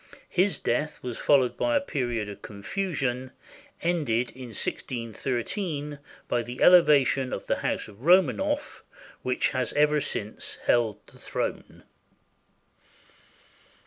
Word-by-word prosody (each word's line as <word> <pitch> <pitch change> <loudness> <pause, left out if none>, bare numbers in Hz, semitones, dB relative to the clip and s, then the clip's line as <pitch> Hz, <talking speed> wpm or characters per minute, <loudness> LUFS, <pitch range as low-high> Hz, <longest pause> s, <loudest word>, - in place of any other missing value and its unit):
His 190 +2 +2
death 150 +6 -2
was 125 -3 -5
followed 130 -4 +3
by 300 - +1
a - - +5
period 120 - -2
of 100 - -9
confusion, 130 - -3 0.5
ended 130 -9 +1
in 130 -1 -9
161 115 +1 -4
3 145 - -3 0.3
by 120 - +1
the 120 +2 -7
elevation 145 -7 +5
of - - -4
the - - 0
House - - -2
of 105 +1 -15
Romanoff, 235 - +2 0.4
which 125 0 +1
has 130 -3 -2
ever 150 0 +3
since 110 -6 -4
held 110 -3 +2
the - - -17
throne. - - -4
130 Hz, 120 wpm, -27 LUFS, 120-165 Hz, 0.5 s, a